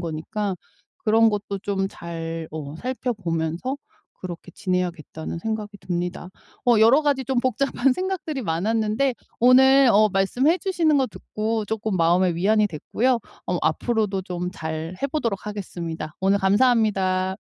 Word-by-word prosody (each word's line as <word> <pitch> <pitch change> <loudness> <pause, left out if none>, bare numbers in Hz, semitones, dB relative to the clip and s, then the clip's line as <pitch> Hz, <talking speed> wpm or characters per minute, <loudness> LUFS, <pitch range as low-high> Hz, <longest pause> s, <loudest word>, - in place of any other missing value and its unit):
거니까 180 +4 -3 0.5
그런 225 +1 +5
것도 205 -1 -3
좀 195 -1 -1
잘 165 -2 -6
어 150 -2 -6
살펴보면서 210 - -2 0.4
그렇게 180 -1 -7
지내야겠다는 175 -4 -3
생각이 210 +1 -4
듭니다. 175 0 -4 0.4
어 235 -3 +5
여러 245 +7 +6
가지 280 -3 +1
좀 260 +1 0
복잡한 260 +1 +1
생각들이 365 -4 -3
많았는데 220 +8 0 0.2
오늘 265 +2 +6
어 215 +1 +5
말씀해 245 - +2
주시는 335 -5 +2
거 265 -2 +3
듣고 220 0 -3
쪼끔 220 -2 -2
마음에 175 +1 +3
위안이 210 +5 +3
됐고요. 230 - 0 0.3
어 180 - 0
앞으로도 195 +4 0
좀 180 -1 -4
잘해보도록 185 - -3
하겠습니다. 170 -6 -5
오늘 195 +1 +3
감사합니다. 195 -3 +2
205 Hz, 320 characters per minute, -23 LUFS, 175-245 Hz, 0.5 s, 여러